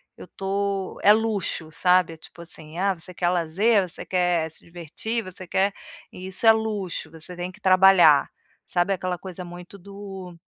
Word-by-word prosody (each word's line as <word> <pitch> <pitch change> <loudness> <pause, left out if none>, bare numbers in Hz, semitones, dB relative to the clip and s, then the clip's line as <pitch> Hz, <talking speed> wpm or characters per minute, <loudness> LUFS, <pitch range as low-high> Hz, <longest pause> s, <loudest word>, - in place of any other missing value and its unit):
eu - - -12
tô 195 0 -3
é 205 - +7
luxo 210 -7 0
sabe. 180 0 +3
É - - -12
tipo 170 - -14
assim: 160 -1 -9
"Ah, 195 +1 +2
você 180 +1 -9
quer 175 -1 +1
lazer? 180 +4 +2
Você - - -9
quer 175 -3 +1
se - - -11
divertir? 175 +7 -4
Você 185 -1 -9
quer 195 +2 +1 0.4
isso 185 +4 -4
é 225 - +11
luxo, 210 -7 -2
você 165 +2 -11
tem 180 +1 -5
que - - -18
trabalhar!". 185 -5 +6 0.4
Sabe 175 +2 +1
aquela 185 -1 -3
coisa 185 0 -8
muito 175 +2 -10
do 195 -2 -9
185 Hz, 170 wpm, -24 LUFS, 175-195 Hz, 0.4 s, é